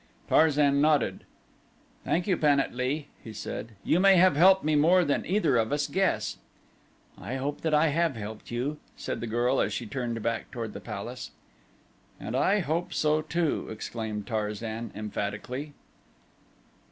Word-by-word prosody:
Tarzan 145 -2 +4
nodded. 150 -1 +2 0.8
"Thank 175 +1 0
you 190 - +2
Pan 145 -3 +3
at - - -1
lee," 135 +4 -2
he 110 - -8
said. 110 +2 -6
"You 170 - +2
may 195 0 +6
have 180 -3 +5
helped 190 +5 +6
me 155 0 +2
more 170 +4 +5
than 145 - 0
either 170 - +2
of 110 -1 +1
us 145 0 +1
guess." 190 +6 0 0.8
"I 130 - -5
hope 140 +2 -3
that 160 -2 +1
I 155 +1 +4
have 165 -1 +1
helped 110 0 -7
you," 130 +6 -3 0.2
said - - -4
the 120 - -3
girl 120 +4 +1
as - - 0
she 120 - -3
turned 120 0 -3
back 115 0 -2
toward 115 -3 -5
the - - -7
palace. - - -6 0.9
"And 110 - -5
I 195 +10 +3
hope 165 +2 -2
so 155 0 +2
too," 160 0 -1
exclaimed 110 -1 -5
Tarzan 110 0 -3
emphatically. 110 +7 -4
140 Hz, 160 wpm, -28 LUFS, 115-160 Hz, 0.9 s, may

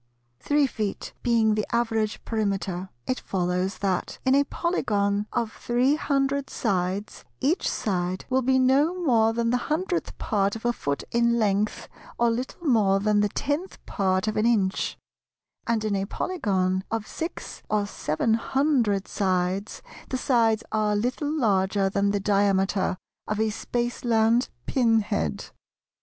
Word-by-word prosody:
Three 290 0 +2
feet 215 -6 -4
being 230 -3 +3
the 215 0 -1
average 225 -2 0
Perimeter 195 -4 -2 0.2
it 255 - -1
follows 180 0 -1
that, 190 -2 -2
in 260 - +4
a 280 +1 +5
Polygon 205 - 0
of 235 -2 -1
three 245 +4 +1
hundred 280 -2 0
sides 195 -1 -2 0.2
each 300 +8 +1
side 185 -2 -2
will 260 0 +2
be 260 +1 +3
no 270 +6 +3
more 230 -9 +3
than 230 0 0
the 250 - +3
hundredth 350 +3 -1
part 200 -2 0
of 225 - -8
a 240 - +2
foot 140 -9 -3
in 235 0 +3
length, 210 -1 0 0.3
or 235 -1 +3
little 255 +8 -4
more 210 -8 +3
than 210 +1 +2
the 205 0 +2
tenth 290 - -2
part 190 0 0
of 215 - -1
an 215 +2 +3
inch; 200 -5 +1 0.7
and 225 -2 0
in 210 -2 0
a 195 0 -1
Polygon 190 - -1
of 225 -1 -2
six 325 +8 -6
or 210 -1 +1
seven 200 +2 -1
hundred 230 -4 +1
sides 190 - -1 0.3
the 260 - -1
sides 230 -4 +2
are 210 -1 +1
little 250 +7 -1
larger 195 -8 +1
than 200 0 +1
the 200 0 0
diameter 195 -1 +1 0.3
of 210 0 -2
a 220 0 +1
Spaceland 235 +1 +1 0.2
pin 230 -4 +3
head. 80 - -3
220 Hz, 150 wpm, -25 LUFS, 200-245 Hz, 0.7 s, a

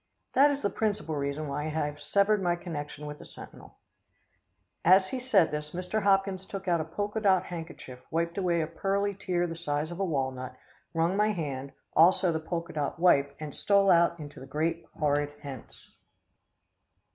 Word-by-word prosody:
"That 280 +3 +6
is 285 0 -2
the 200 - +1
principal 205 -7 -1
reason 140 +1 -2
why 145 +2 -3
I - - -2
have 150 -1 -2
severed 200 +1 +2
my 175 -2 +2
connection 150 -4 -6
with 150 0 -7
the - - -11
Sentinel." - - -12 1.1
As 190 +2 +6
he 260 - -3
said 215 -10 +3
this, 150 0 -4
Mr. 185 +4 -2
Hopkins 195 -1 +2
took 195 -1 -7
out 170 -2 +2
a - - -4
polka 205 +6 -3
dot 190 -4 +4
handkerchief 165 -7 -8
wiped 170 +3 -1
away 175 -3 +1
a - - 0
pearly 200 +5 -1
tear 180 -2 -1
the 165 -1 -4
size 150 -1 -2
of 175 - -7
a - - +1
walnut, 130 -6 -2 0.4
wrung 165 +3 +2
my 210 +1 +3
hand, 140 -6 -4 0.2
also 175 +2 +5
the 160 - -1
polka 165 +1 -4
dot 150 -2 -2
wipe, 140 -5 +4
and 150 -2 -6
stole 200 -1 +3
out 170 0 +4
into 145 -2 -9
the 135 - -10
great, 160 +4 -2
horrid 145 -1 +1
hence. 135 -4 -10
170 Hz, 180 wpm, -29 LUFS, 150-195 Hz, 1.1 s, That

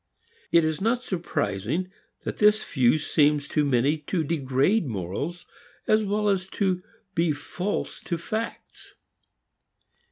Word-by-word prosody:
It 170 -1 +5
is 155 +1 -1
not 235 +4 +1
surprising 165 - -2 0.3
that - - -4
this 210 0 +5
view 125 +2 +3
seems 150 -1 +2
to 150 - +2
many 140 +3 +2
to 160 +3 -1
degrade 145 +5 +1
morals, 110 - -4 0.4
as 215 0 +3
well 210 +1 0
as 195 -2 +1
to 185 -3 +1 0.3
be 170 -2 +2
false 180 +7 -4
to 170 - -1
facts. 215 +7 -6
165 Hz, 125 wpm, -26 LUFS, 145-195 Hz, 0.4 s, It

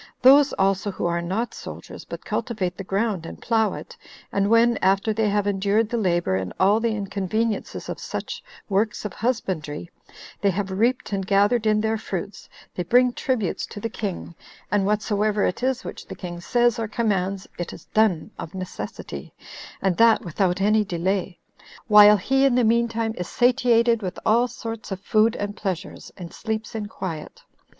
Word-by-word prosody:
Those 280 +2 +7
also 195 +1 +1
who 190 - -4
are 170 0 0
not 195 +8 -2
soldiers, - - -9
but - - -8
cultivate 190 -7 -2
the 195 - -6
ground, 195 -1 -1
and - - -9
plough 225 -2 +1
it, - - -9 0.4
and 200 0 +1
when, 230 0 +4
after 195 +3 +2
they 215 0 +1
have 205 0 +1
endured 205 +2 +1
the 235 - -1
labor 175 - +1
and 95 -1 -3
all 200 +3 +4
the 225 -1 0
inconveniences 205 +2 -2
of - - -5
such - - -5 0.2
works 210 +2 0
of 210 - -4
husbandry, 180 - -3 0.5
they 200 - +3
have 195 +1 -2
reaped 230 +3 0
and 195 -1 -2
gathered 205 +3 +3
in 215 0 +3
their 220 0 0
fruits, 195 -1 -6 0.2
they - - -3
bring 245 +7 +4
tributes 235 -10 -1
to - - -8
the 225 +2 -4
king; 195 -6 -5 0.4
and 200 -1 +2
whatsoever 210 0 +1
it 180 - -2
is 260 0 0
which - - -8
the - - -7
king 175 -2 -7
says 240 +4 +2
or 225 - -1
commands, 195 -4 -1
it 175 - -3
is - - -12
done 215 -7 +2
of 165 - -7
necessity, 185 -1 -7 0.5
and 190 -3 +1
that 230 -2 +5
without 180 +2 0
any 215 +2 +3
delay, 185 0 -2 0.5
while 210 -1 +8
he 270 +7 +1
in 270 -3 +4
the 250 - +3
mean 235 +1 +3
time 225 -1 -2
is 180 - -3
satiated 240 -2 +3
with 185 -2 -4
all 235 +3 +4
sorts 230 -3 -7
of 190 - -3
food 220 +3 +3
and 205 0 -4
pleasures, 190 -3 -5
and 175 -3 -8
sleeps 220 -1 -4
in 215 -2 -4
quiet. 165 -7 -7
210 Hz, 180 wpm, -24 LUFS, 190-230 Hz, 0.5 s, while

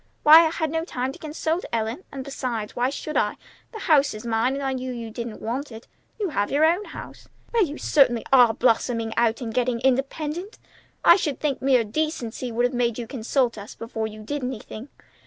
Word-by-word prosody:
"Why, 320 +2 +9
I - - -1
had 315 -2 -2
no 325 0 -1
time 260 -6 -3
to - - -13
consult 315 +2 -2
you, - - -9
Ellen; 230 +8 -2
and, 270 -1 -6
besides, 250 -6 -4
why 245 +1 +1
should 305 +2 -6
I? - - +1 0.4
The 440 -3 -8
house 290 - +3
is 215 - -9
mine, 230 +3 +1
and 280 - -4
I 270 -1 0
knew 255 0 -4
you 230 -2 -6
didn't 235 -1 -6
want 255 +5 -3
it. 225 +1 -11 0.3
You 405 -3 -1
have 205 -9 -1
your 295 +3 +3
own 350 +6 +2
home." - - -9 0.4
"Well, 460 -3 +4
you 300 -3 -4
certainly 245 -6 +3
are 245 -3 +7
blossoming 230 -1 +1
out 230 +1 +1
and 225 -2 -4
getting 245 -1 0
independent! 295 - -1 0.5
I - - +8
should 295 -8 -2
think 290 -3 -1
mere 260 -3 +4
decency 250 -1 -3
would 240 +2 +1
have 245 - -1
made 240 -2 0
you 240 - -4
consult 240 -1 -1
us 205 - -10
before 225 -1 -4
you 215 0 -10
did 290 +6 -4
anything. 250 0 -6
255 Hz, 210 wpm, -24 LUFS, 230-295 Hz, 0.5 s, Why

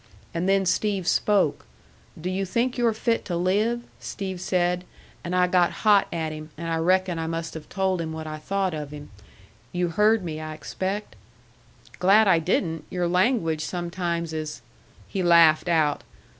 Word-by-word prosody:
And 175 +3 -1
then 195 0 +3
Steve 195 -1 0
spoke. 200 -8 +2 0.5
'Do 170 - -5
you 185 +1 -1
think 235 +6 0
you're 240 -2 +2
fit 230 +1 0
to 175 -3 -2
live?' 210 +7 +1 0.2
Steve 190 -2 -5
said; 180 -1 0 0.4
and 175 +1 -3
I 180 0 +4
got 180 -1 +3
hot 205 -2 +5
at 160 -2 -2
him, 155 0 -8
and 165 +1 -5
I 165 - 0
reckon 180 +1 +1
I 160 - -2
must 165 0 -4
have 155 -2 -9
told 190 -2 0
him 160 -1 -4
what 160 0 -6
I 155 0 -6
thought 190 +2 -1
of 150 -2 -5
him. 145 -3 -10 0.6
You 175 0 0
heard 210 +4 +3
me, 155 -3 -4
I 155 0 -6
expect?" 190 - -4 0.8
"Glad 200 +4 +5
I 170 -3 +5
didn't. 165 -1 -1
Your 180 -1 -1
language 180 -4 +1
sometimes 170 -1 -3
is 155 -5 -5 0.2
" - - -27
He 195 - -3
laughed 170 -1 +5
out. 155 -3 +2
180 Hz, 175 wpm, -25 LUFS, 160-195 Hz, 0.8 s, hot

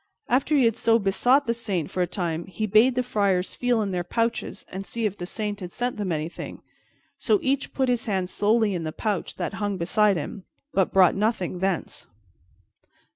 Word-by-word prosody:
After 275 +4 +2
he 260 - +4
had 230 -2 +3
so 230 0 +3
besought 245 +7 +3
the 230 - +1
Saint 200 -9 -3
for 185 - -1
a 180 - +2
time, 170 -2 -3
he 215 +3 -3
bade 215 +5 +4
the 250 - +1
friars 200 -6 0
feel 245 -3 +1
in 200 - -3
their 180 -1 -1
pouches 230 +6 -2
and 190 +1 -5
see 230 +3 -3
if 205 -2 -1
the 175 -3 -6
Saint 210 0 -4
had 180 -1 -7
sent 245 +3 -2
them 200 -4 -2
anything; 160 +1 -5 0.6
so 420 - +3
each 275 0 0
put 265 -1 0
his 245 -2 0
hand 190 -3 0
slowly 215 +2 +2
in 175 -2 -3
the 155 - -3
pouch 205 +2 -3
that - - -3
hung 205 -2 -1
beside 200 +3 +2
him, 185 +5 -5 0.3
but 190 -2 +2
brought 185 -2 +6
nothing 195 -4 -1
thence. 190 -2 -2
205 Hz, 200 wpm, -25 LUFS, 185-230 Hz, 0.6 s, brought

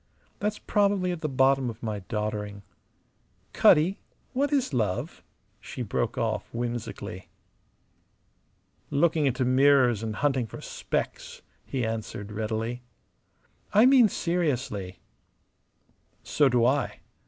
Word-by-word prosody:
That's 210 0 -1
probably 200 -3 +1
at 175 -2 -5
the 155 - -1
bottom 135 -1 +3
of 115 +1 -9
my 110 -2 -3
doddering. 105 0 -4 0.9
Cutty, 170 +6 +4 0.3
what 280 +3 0
is 270 - +1
love?" 105 -7 -2 0.4
she 125 - -6
broke 115 +2 -2
off, 110 -4 -2
whimsically. 120 -6 -5 1.6
"Looking 155 0 +2
into 130 0 0
mirrors 130 -3 +4
and 110 -1 -4
hunting 135 -2 0
for - - -9
specks," - - -4 0.2
he 130 -3 -2
answered, 110 -2 -5
readily. 110 +3 -3 0.9
"I 215 +3 +7
mean 255 -4 +6
seriously." 130 - -2 1.2
"So 145 -3 +3
do 120 -2 +3
I. 135 +3 0
125 Hz, 110 wpm, -27 LUFS, 110-155 Hz, 1.6 s, I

